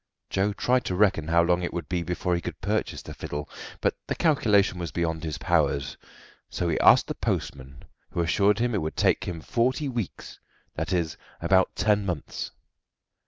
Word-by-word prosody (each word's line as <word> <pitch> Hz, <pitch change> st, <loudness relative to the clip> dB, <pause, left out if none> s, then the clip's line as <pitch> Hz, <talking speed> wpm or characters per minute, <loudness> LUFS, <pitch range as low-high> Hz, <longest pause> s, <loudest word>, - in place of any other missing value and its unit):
Joe 100 Hz, +2 st, +1 dB
tried 125 Hz, +4 st, +1 dB
to 90 Hz, -, -1 dB
reckon 90 Hz, -6 st, +2 dB
how 85 Hz, +1 st, +4 dB
long 90 Hz, +1 st, +2 dB
it 90 Hz, -, -2 dB
would 85 Hz, -4 st, -4 dB
be 90 Hz, +1 st, -1 dB
before 90 Hz, +1 st, -1 dB
he 85 Hz, -, 0 dB
could -, -, -6 dB
purchase -, -, -2 dB
the -, -, -8 dB
fiddle, 75 Hz, 0 st, -5 dB, 0.3 s
but -, -, +2 dB
the -, -, -1 dB
calculation 105 Hz, -, +3 dB
was 85 Hz, -3 st, -4 dB
beyond 80 Hz, -1 st, -2 dB
his 80 Hz, -2 st, -3 dB
powers; 70 Hz, -1 st, +1 dB, 0.5 s
so 90 Hz, -, -2 dB
he 80 Hz, -, 0 dB
asked -, -, +7 dB
the -, -, -3 dB
postman, 70 Hz, 0 st, -4 dB, 0.3 s
who 85 Hz, -, -1 dB
assured 100 Hz, +5 st, +3 dB
him 120 Hz, +1 st, 0 dB
it 105 Hz, -, 0 dB
would 80 Hz, 0 st, -4 dB
take -, -, +2 dB
him 85 Hz, -3 st, -5 dB
forty 130 Hz, -, 0 dB
weeks 120 Hz, -7 st, -5 dB, 0.3 s
that 80 Hz, +4 st, -3 dB
is, 85 Hz, -4 st, 0 dB, 0.2 s
about 95 Hz, -1 st, +3 dB
ten 105 Hz, -1 st, +2 dB
months. 90 Hz, -7 st, -4 dB
90 Hz, 185 wpm, -26 LUFS, 80-105 Hz, 0.5 s, asked